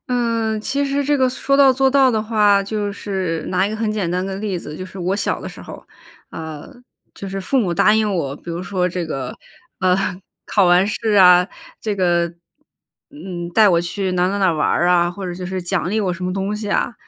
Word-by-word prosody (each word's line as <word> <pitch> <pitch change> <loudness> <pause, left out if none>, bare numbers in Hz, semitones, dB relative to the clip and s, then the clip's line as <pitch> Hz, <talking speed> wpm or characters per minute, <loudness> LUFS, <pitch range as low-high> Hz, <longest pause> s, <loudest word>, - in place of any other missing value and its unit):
呃， 230 -3 0
其 280 +6 -1
实 280 0 -1
这 290 +1 +2
个 260 -1 +3
说 275 +2 0
到 275 -1 +6
做 265 +1 +2
到 270 -1 +4
的 220 -2 0
话， 210 -2 +3
就 205 0 -3
是 190 -5 -3
拿 185 +1 +1
一 - - -4
个 215 - -4
很 220 -1 -1
简 200 -5 -2
单 180 +1 -1
个 195 0 -4
例 200 -2 -3
子， 150 -2 -8
就 185 - -6
是 190 +1 -11
我 185 +2 -1
小 - - -1
的 - - -6
时 - - -11
候 - - -9
儿， - - -14 0.4
呃， 160 -2 -8 0.4
就 195 - -7
是 195 0 -4
父 265 +8 0
母 195 -8 +1
答 210 - +4
应 215 -1 +1
我， 140 -6 -2
比 170 - -9
如 170 +2 -4
说 185 -2 -1
这 180 -1 -3
个， 135 -5 -5 0.4
呃， 185 -1 +3 0.5
考 200 - +3
完 180 +2 +4
试 215 +1 -1
啊， 180 -2 +7 0.3
这 215 -2 -2
个， 175 -2 +2 0.8
嗯， 185 - -7
带 215 -2 +6
我 170 -3 +3
去 185 +2 -2
哪 180 0 +1
哪 200 +1 -2
哪 190 -3 +3
玩 155 - 0
儿 175 - +2
呀， 175 -1 +3
或 190 +2 -7
者 175 - -4
就 180 +1 -7
是 185 0 -3
奖 175 +1 -1
励 220 +2 0
我 190 -3 0
什 180 +1 -6
么 180 - -2
东 195 +2 -2
西 210 0 -6
呀。 225 - 0
195 Hz, 255 characters per minute, -20 LUFS, 180-215 Hz, 0.8 s, 啊